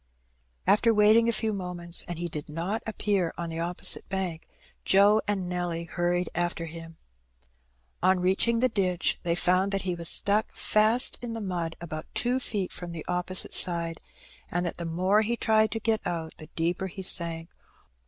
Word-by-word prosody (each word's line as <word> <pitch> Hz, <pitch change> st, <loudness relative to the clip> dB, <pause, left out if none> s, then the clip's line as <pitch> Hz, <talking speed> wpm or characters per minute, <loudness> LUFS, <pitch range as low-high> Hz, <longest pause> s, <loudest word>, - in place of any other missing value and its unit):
After 215 Hz, +4 st, +4 dB
wait 210 Hz, +1 st, +6 dB
ing 230 Hz, 0 st, +4 dB
a -, -, +4 dB
few 220 Hz, -1 st, -1 dB
moments, 180 Hz, -3 st, -3 dB
and 175 Hz, -, -4 dB
he 175 Hz, +1 st, -3 dB
did 150 Hz, -3 st, -7 dB
not 175 Hz, +8 st, -2 dB
appear 200 Hz, -5 st, -1 dB
on 170 Hz, -1 st, -4 dB
the 165 Hz, 0 st, -5 dB
opposite 175 Hz, +1 st, 0 dB
bank, 185 Hz, -4 st, -3 dB, 0.4 s
Joe 205 Hz, +3 st, +5 dB
and 195 Hz, -3 st, -1 dB
Nelly 175 Hz, -2 st, -2 dB
hurried 175 Hz, +1 st, -1 dB
after 175 Hz, -1 st, -1 dB
him. 165 Hz, 0 st, -9 dB, 1.0 s
On 185 Hz, +1 st, +3 dB
reaching 195 Hz, +6 st, +2 dB
the 255 Hz, -, +5 dB
ditch 185 Hz, -6 st, 0 dB
they 170 Hz, -1 st, 0 dB
found 185 Hz, +3 st, +2 dB
that 195 Hz, -1 st, -1 dB
he 185 Hz, -2 st, -1 dB
was 170 Hz, -1 st, +2 dB
stuck 205 Hz, +2 st, +1 dB
fast 215 Hz, +3 st, +2 dB
in 240 Hz, -2 st, -5 dB
the 225 Hz, -, -4 dB
mud 175 Hz, -5 st, -3 dB
about 155 Hz, -1 st, -6 dB
two 250 Hz, +2 st, +2 dB
feet 205 Hz, -7 st, -3 dB
from 175 Hz, -1 st, -7 dB
the 160 Hz, -, -6 dB
opposite 180 Hz, +1 st, -1 dB
side, 170 Hz, -2 st, +2 dB, 0.5 s
and 175 Hz, +1 st, -1 dB
that 170 Hz, -, -3 dB
the 170 Hz, -, -5 dB
more 185 Hz, +6 st, +2 dB
he 235 Hz, +2 st, -1 dB
tried 220 Hz, -1 st, +3 dB
to 225 Hz, -, -3 dB
get 220 Hz, 0 st, 0 dB
out 165 Hz, -2 st, -4 dB
the 155 Hz, -, -10 dB
deeper 170 Hz, +3 st, -1 dB
he 190 Hz, +1 st, -8 dB
sank. 170 Hz, -2 st, +1 dB
180 Hz, 185 wpm, -27 LUFS, 170-210 Hz, 1.0 s, wait